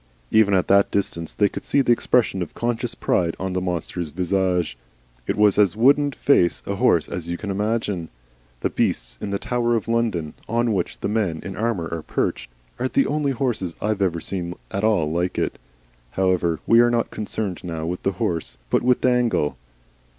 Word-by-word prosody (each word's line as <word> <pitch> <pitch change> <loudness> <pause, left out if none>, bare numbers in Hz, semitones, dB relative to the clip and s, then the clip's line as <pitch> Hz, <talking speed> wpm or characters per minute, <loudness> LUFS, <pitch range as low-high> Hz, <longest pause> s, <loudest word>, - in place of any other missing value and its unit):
Even 105 -3 +5
at 90 - +1
that 100 0 +5
distance 85 -5 -2
they 105 - +2
could - - -7
see 140 - +2
the 125 - +2
expression 115 -4 +2
of 85 - -5
conscious 120 0 -2
pride 85 -2 0
on 95 0 -3
the 90 - -1
monster's 90 -2 -3
visage. 90 -2 0 0.5
It - - 0
was 105 -1 +4
as 100 -2 +4
wooden 140 +5 +4
faced 90 - +2
a - - -3
horse - - +3
as 85 -1 -5
you 85 - -2
can 100 +1 -4
imagine. 105 -4 -1 0.5
The - - 0
beasts - - -1
in - - -3
the 100 - -1
Tower 120 +2 0
of 110 - -2
London, 115 -10 0 0.2
on 115 0 +1
which 90 -3 -2
the - - -1
men 100 -7 0
in 95 -1 -6
armour 110 -7 -1
are 85 -1 -3
perched, - - -2 0.3
are 130 - +1
the 135 - +2
only 145 -1 0
horses 115 -9 -2
I 105 - -1
have 105 -2 -1
ever 85 -3 +1
seen 90 -1 -3 0.2
at 100 +2 -2
all 95 -9 +2
like 90 +2 -1
it. - - -1 0.5
However, 90 -1 +1
we 115 - +5
are 120 0 +6
not 120 -1 0
concerned 105 -3 -4
now 80 -3 -4
with 90 +2 -3
the 95 - 0
horse, 85 -2 -2
but - - +3
with 125 0 +2
Dangle. 120 - +2
100 Hz, 195 wpm, -23 LUFS, 85-115 Hz, 0.5 s, are